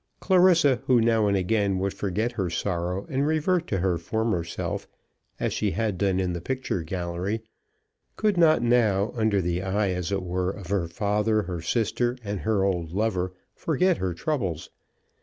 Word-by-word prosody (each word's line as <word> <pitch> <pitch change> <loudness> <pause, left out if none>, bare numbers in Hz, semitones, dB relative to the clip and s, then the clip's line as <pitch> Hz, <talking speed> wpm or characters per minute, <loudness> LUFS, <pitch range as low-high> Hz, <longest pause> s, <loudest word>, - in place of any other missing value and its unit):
Clarissa, 175 -8 +4
who 125 -2 +5
now 115 -2 +3
and 100 -1 +2
again 100 0 +1
would 95 +1 -1
forget 105 +4 -1
her 100 -7 -2
sorrow 90 +2 -2
and 140 +2 0
revert 165 +3 +1
to 100 - -1
her 90 -2 0
former 110 0 -1
self, 85 - -4 0.5
as - - -1
she - - 0
had 105 0 -1
done 95 -2 +1
in 90 -2 0
the 85 - -4
picture 130 -4 -2
gallery, 90 +5 -3 0.7
could 210 -2 +1
not 160 -7 +4
now, 110 -4 +3
under 110 -4 +1
the 90 +1 -1
eye 100 +1 0
as 90 0 -3
it 95 -1 -1
were 90 0 -1
of 95 -2 -7
her 95 -4 0
father, 105 +4 0
her 85 -2 -5
sister, 120 +6 0
and 100 -1 -3
her 105 -2 +1
old 90 -4 -1
lover, 95 -2 0 0.2
forget 170 +3 +1
her 90 -2 -2
troubles. 95 - -2
100 Hz, 175 wpm, -26 LUFS, 90-115 Hz, 0.7 s, who